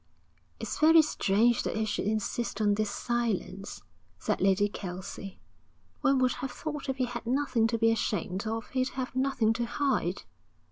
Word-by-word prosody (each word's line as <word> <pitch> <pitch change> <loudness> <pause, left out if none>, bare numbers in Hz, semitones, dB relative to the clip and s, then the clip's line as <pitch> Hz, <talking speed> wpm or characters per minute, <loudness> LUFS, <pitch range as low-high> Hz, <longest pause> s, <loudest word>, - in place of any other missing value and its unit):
'It's - - -4
very 320 +1 +7
strange 235 -4 +2
that - - -2
he 220 - +1
should 205 -1 -2
insist 220 +3 -1
on 205 -1 +3
this 215 0 0
silence,' 225 -4 -2 0.3
said - - -1
Lady 195 +1 +4
Kelsey. 190 0 -7 0.6
'One 275 0 +3
would 255 -1 +3
have 270 - -2
thought 295 -1 -5
if 265 - -1
he 255 - +1
had 240 -1 -6
nothing 255 -3 +2
to 230 0 0
be 225 0 +4
ashamed 210 -3 -1
of, 225 0 -3
he'd 255 0 0
have 255 -1 -3
nothing 260 -4 +2
to 240 +1 -1
hide.' 260 - 0
230 Hz, 170 wpm, -29 LUFS, 205-260 Hz, 0.6 s, very